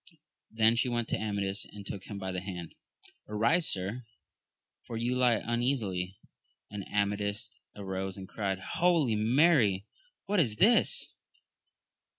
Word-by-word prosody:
Then 110 +1 +3
she 125 - +2
went 120 -1 -1
to - - +1
Amadis, 100 -2 -2
and 100 -1 -11
took 95 -1 -6
him 100 - -7
by 95 -1 -4
the 90 -1 -3
hand! 90 -3 -7 0.3
— - - -25
Arise, 115 +11 +3
Sir, 100 +6 -3 0.7
for 115 - -6
you 120 +2 0
lie 125 -3 +3
un 120 +2 -1
easily? 95 -8 -1 0.5
and 105 -1 -5
Amadis 105 +3 -1 0.2
arose 95 -1 -4
and 95 -1 -8
cried, 100 -2 -2
Holy 155 - +1
Mary! 110 - +3 0.4
what 200 0 +1
is 115 -10 +2
this 235 - +4
105 Hz, 145 wpm, -30 LUFS, 95-120 Hz, 0.7 s, this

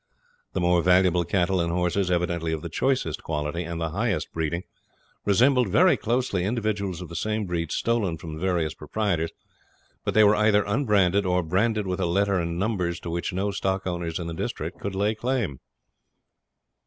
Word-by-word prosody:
The - - -1
more 90 0 +3
valuable 90 0 +4
cattle 95 0 +1
and 85 0 -1
horses, 90 +2 0
evidently 85 -2 0
of 80 - -4
the 85 - -4
choicest 85 - 0
quality 75 +2 -3
and 85 -1 -5
the 80 -1 -2
highest 100 -5 -1
breeding, 80 +2 -2 0.6
resembled 125 +3 +4
very 105 - +5
closely 115 -6 0
individuals 100 -4 -2
of - - -8
the 85 - -8
same 110 +4 -1
breed 85 -2 -2
stolen 110 -8 0
from 80 -1 -8
the 80 - -7
various 85 -4 0
proprietors. 95 -7 -1 0.7
But - - -2
they 110 - +7
were 105 0 +6
either 105 -1 +4
unbranded 100 -4 +2
or 90 0 +2
branded 105 +6 +1
with 90 0 -2
a 90 - +1
letter 100 +2 +2
and 85 0 -2
numbers 90 -4 -1
to 85 - -5
which 85 +1 -2
no 95 +3 -1
stock 95 -1 -1
owners 85 -2 -3
in 85 - -4
the 85 - -4
district 80 - -4
could 100 -1 -4
lay 105 +3 +1
claim. 115 - -2
90 Hz, 180 wpm, -25 LUFS, 85-105 Hz, 0.7 s, they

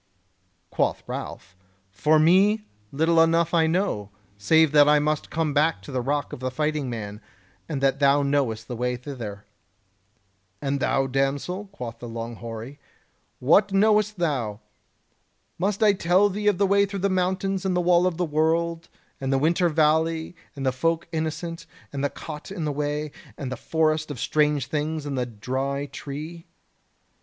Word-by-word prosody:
Quoth - - 0
Ralph: 90 +1 -7 0.4
"For 150 +11 +3
me, 195 +7 +4 0.3
little 165 +3 +3
enough 165 +1 +3
I 165 -1 +4
know, 160 - -1 0.3
save 155 +10 +4
that 145 -1 +6
I 150 - +6
must 150 +1 0
come 155 -2 -1
to 150 0 +1
the 130 -1 -1
Rock 145 +2 -2
of - - -6
the 130 0 -2
Fighting 150 +1 -1
Man, 105 -2 -6 0.5
and 145 -4 -3
that 135 0 +2
thou 140 0 +4
knowest 135 -6 0
the 120 - -5
way 125 +1 -1
thither." 120 -6 -7 1.1
"And 140 +2 -1
thou, 135 0 +1
damsel," 135 +9 -1
quoth 120 - -8
the 120 - -7
long 115 0 -6
hoary, 115 +5 -8 0.6
"what 195 +10 +4
knowest 210 +1 +3
thou? 125 - -1 1.0
Must 200 +4 0
I 210 -1 +6
tell 185 +2 +3
thee 205 +2 -3
of 205 -3 +4
the 200 - +3
way 200 +1 +3
through 200 0 -5
the - - +5
mountains 190 0 0
and 190 -2 0
the - - +2
Wall 175 0 +4
of 175 -3 -2
the 180 - 0
World, 165 +2 0 0.3
and 135 0 -2
the 135 - +3
Winter 170 +5 +2
Valley, 160 +2 +1 0.2
and 135 -1 -4
the 130 - +3
Folk 165 +6 -1
Innocent, 165 +1 -4 0.3
and 140 0 -3
the 145 - +2
Cot 150 +5 -8
on 175 -5 -3
the 150 - 0
Way, 150 +1 -2 0.3
and 135 -3 -5
the - - -2
Forest 155 -1 0
of 145 -5 -6
Strange 150 -2 +1
Things 155 +1 -2
and 145 -1 -3
the 125 -2 -1
Dry 130 +5 -3
Tree?" 155 +5 -8
150 Hz, 170 wpm, -25 LUFS, 135-170 Hz, 1.1 s, that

